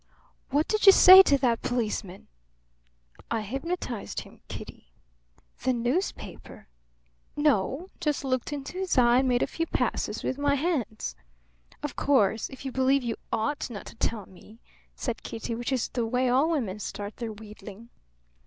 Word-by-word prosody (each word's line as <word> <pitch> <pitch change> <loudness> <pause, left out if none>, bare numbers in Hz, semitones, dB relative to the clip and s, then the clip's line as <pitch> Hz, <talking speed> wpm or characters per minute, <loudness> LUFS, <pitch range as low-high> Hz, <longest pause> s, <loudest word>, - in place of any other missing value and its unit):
What 290 +3 +1
did 430 -1 +1
you - - +13
say 375 0 +10
to 285 -7 +4
that 240 -3 +1
policeman?" 215 -6 -3 1.0
"I 230 -1 -1
hypnotized 270 - -4
him, - - -16
Kitty." - - -9 0.7
"The 255 - +1
newspaper?" 250 +11 -3 0.7
"No. 290 - +1
Just 300 -5 -1
looked 255 -1 -1
into 290 +5 -5
his 380 -6 -1
eye 240 0 +5
and 265 - +1
made 245 -1 +2
a - - +2
few 330 0 -3
passes - - -2
with 260 - -2
my 285 0 +2
hands." 275 - -2 0.7
"Of 295 - -4
course, 225 -6 +2
if 265 +1 -11
you 265 - -3
believe 265 +1 +2
you 235 -2 -2 0.2
ought 270 +8 -1
not 210 -4 -8
to - - -11
tell 220 -3 -2
me 210 +5 -17 0.2
" - - -34
said 240 -4 -4
Kitty, 225 +1 -5
which 240 +3 -3
is 255 -3 0
the 235 -2 -2
way 250 +2 +1
all 270 +6 +3
women 225 - -2
start 205 0 -6
their 230 -2 -4
wheedling. 210 +1 -12
255 Hz, 165 wpm, -27 LUFS, 225-285 Hz, 1.0 s, you